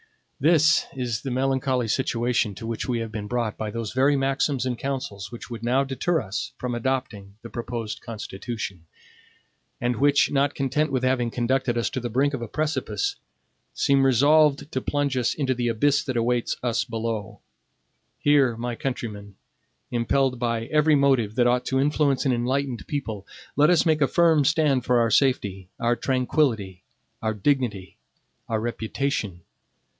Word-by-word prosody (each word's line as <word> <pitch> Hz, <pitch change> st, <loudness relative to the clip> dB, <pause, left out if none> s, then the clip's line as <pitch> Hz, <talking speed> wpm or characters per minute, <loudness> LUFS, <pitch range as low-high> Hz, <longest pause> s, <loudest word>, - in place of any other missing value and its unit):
This 155 Hz, +2 st, +4 dB
is 120 Hz, -4 st, -2 dB
the 135 Hz, -, -4 dB
melancholy 130 Hz, -1 st, 0 dB
situation 120 Hz, -3 st, 0 dB
to 115 Hz, -, -8 dB
which 115 Hz, +2 st, -4 dB
we 120 Hz, -, +1 dB
have 115 Hz, -1 st, -4 dB
been 105 Hz, -1 st, -5 dB
brought 115 Hz, -2 st, -1 dB
by 110 Hz, -, -2 dB
those 115 Hz, 0 st, -5 dB
very 135 Hz, +3 st, +3 dB
maxims 135 Hz, -1 st, 0 dB
and 125 Hz, -1 st, -1 dB
councils 115 Hz, -7 st, -4 dB
which 120 Hz, +1 st, -9 dB
would 115 Hz, -1 st, -6 dB
now 125 Hz, +3 st, +2 dB
deter 140 Hz, +5 st, 0 dB
us 110 Hz, +5 st, -4 dB
from 125 Hz, -1 st, -3 dB
adopting 120 Hz, -5 st, -3 dB
the 115 Hz, -, -9 dB
proposed 115 Hz, -2 st, -5 dB
Constitution; 105 Hz, -5 st, -6 dB, 0.9 s
and 120 Hz, -1 st, -1 dB
which, 145 Hz, +2 st, +3 dB
not 140 Hz, 0 st, +1 dB
content 140 Hz, +2 st, 0 dB
with 130 Hz, -1 st, -1 dB
having 130 Hz, -2 st, +1 dB
conducted 125 Hz, +1 st, 0 dB
us 115 Hz, -, 0 dB
to 130 Hz, -, -2 dB
the 120 Hz, -1 st, -4 dB
brink 135 Hz, +5 st, +1 dB
of 135 Hz, -, -3 dB
a 115 Hz, -, -4 dB
precipice, 155 Hz, -, -2 dB, 0.6 s
seem 140 Hz, -2 st, +3 dB
resolved 145 Hz, +3 st, +4 dB
to 130 Hz, -, -2 dB
plunge 145 Hz, -1 st, -1 dB
us 125 Hz, -2 st, 0 dB
into 135 Hz, -3 st, 0 dB
the 120 Hz, -1 st, -2 dB
abyss 135 Hz, +5 st, +2 dB
that 130 Hz, -3 st, -2 dB
awaits 120 Hz, +1 st, 0 dB
us 120 Hz, -1 st, +1 dB
below. 115 Hz, -2 st, -4 dB, 0.8 s
Here, 140 Hz, -5 st, +3 dB
my 120 Hz, +1 st, -3 dB
countrymen, 110 Hz, -6 st, -5 dB, 0.6 s
impelled 125 Hz, +2 st, +1 dB
by 115 Hz, -2 st, -1 dB
every 150 Hz, +3 st, +3 dB
motive 135 Hz, -7 st, +2 dB
that 120 Hz, -, +3 dB
ought 125 Hz, +1 st, +2 dB
to 130 Hz, -, 0 dB
influence 145 Hz, -1 st, +1 dB
an 130 Hz, -, +3 dB
enlightened 125 Hz, +1 st, -1 dB
people, 110 Hz, -9 st, -4 dB, 0.3 s
let 150 Hz, +2 st, +5 dB
us 175 Hz, -2 st, +4 dB
make 155 Hz, -2 st, +2 dB
a 140 Hz, -, +5 dB
firm 165 Hz, -2 st, +4 dB
stand 150 Hz, -4 st, +2 dB
for 125 Hz, -1 st, +3 dB
our 115 Hz, -1 st, +2 dB
safety, 100 Hz, -8 st, +1 dB
our 120 Hz, +1 st, +2 dB
tranquillity, 125 Hz, -, 0 dB, 0.4 s
our 110 Hz, -1 st, -1 dB
dignity, 105 Hz, -4 st, -1 dB, 0.5 s
our 110 Hz, -1 st, 0 dB
reputation. 115 Hz, -4 st, -3 dB
125 Hz, 165 wpm, -24 LUFS, 115-140 Hz, 0.9 s, let